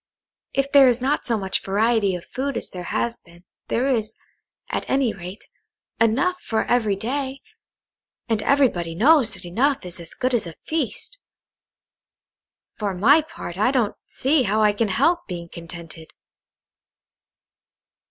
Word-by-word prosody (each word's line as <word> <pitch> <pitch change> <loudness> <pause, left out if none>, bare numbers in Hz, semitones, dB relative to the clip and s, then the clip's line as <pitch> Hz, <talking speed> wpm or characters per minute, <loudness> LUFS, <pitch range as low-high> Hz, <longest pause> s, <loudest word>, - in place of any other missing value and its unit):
If 275 +1 0
there 280 -2 +8
is 245 -1 +3
not 275 +4 0
so 230 -2 +2
much 190 -2 -1
variety 205 -1 +1
of 175 - -8
food 270 -1 -3
as - - -2
there 180 -1 -7
has 235 0 -1
been, 170 +1 -20 0.2
there 250 +3 0
is, 220 -5 -1 0.5
at - - -3
any 265 -4 +2
rate, 185 +2 -9 0.5
enough 265 +12 +2
for 220 -1 -1
every 220 -5 +2
day, 265 +5 -3 0.8
and 225 -3 0
everybody 215 -12 +2
knows 265 - +5
that - - -9
enough 255 +8 0
is 180 0 -6
as 170 -1 -9
good 255 0 -1
as 230 -7 +1
a 165 - -9
feast. 320 - -3 1.6
For 200 -3 -2
my 270 - +5
part, 190 - -8
I 215 - +4
don't 245 -6 +1
see 280 +2 +1
how 215 -2 +2
I 210 -1 +4
can 220 +2 0
help 310 - +1
being 170 -2 -6
contented." 170 -1 -9
225 Hz, 150 wpm, -23 LUFS, 190-270 Hz, 1.6 s, there